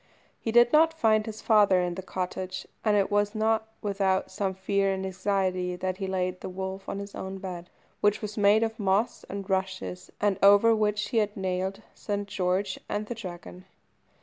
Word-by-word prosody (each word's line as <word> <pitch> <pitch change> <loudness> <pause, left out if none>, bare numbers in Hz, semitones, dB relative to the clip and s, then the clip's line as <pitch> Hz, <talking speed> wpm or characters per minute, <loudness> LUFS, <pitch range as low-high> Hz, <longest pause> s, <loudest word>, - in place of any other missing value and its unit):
He 225 - -2
did 240 +3 +5
not 320 +1 +5
find 215 -7 +3
his 220 0 -7
father 205 -4 +5
in 180 -1 -1
the 190 - -5
cottage, 185 0 -4 0.2
and 210 -2 +3
it 200 0 +1
was 205 +1 +1
not 220 0 +1 0.2
without 195 -2 0
some 190 0 -2
fear 195 +1 +1
and 190 0 -2
anxiety 185 -1 -1
that 185 0 -3
he 195 -1 -3
laid 185 -1 -2
the - - -5
wolf 190 +1 -5
on - - -3
his 200 0 -7
own 190 0 -5
bed, 180 -2 -7 0.3
which 205 0 +2
was 210 -1 -6
made 210 +1 +4
of 225 0 -3
moss 200 +3 +1
and 200 -1 -5
rushes, 190 -1 -3
and 205 -2 +1
over 205 +3 +7
which 210 -1 0
he 230 - -1
had 210 -1 +1
nailed 190 0 -2
St. 205 -1 -4
George 190 0 -1
and 210 +1 -2
the 240 - -4
Dragon. 180 -3 -9
195 Hz, 190 wpm, -27 LUFS, 190-210 Hz, 0.3 s, over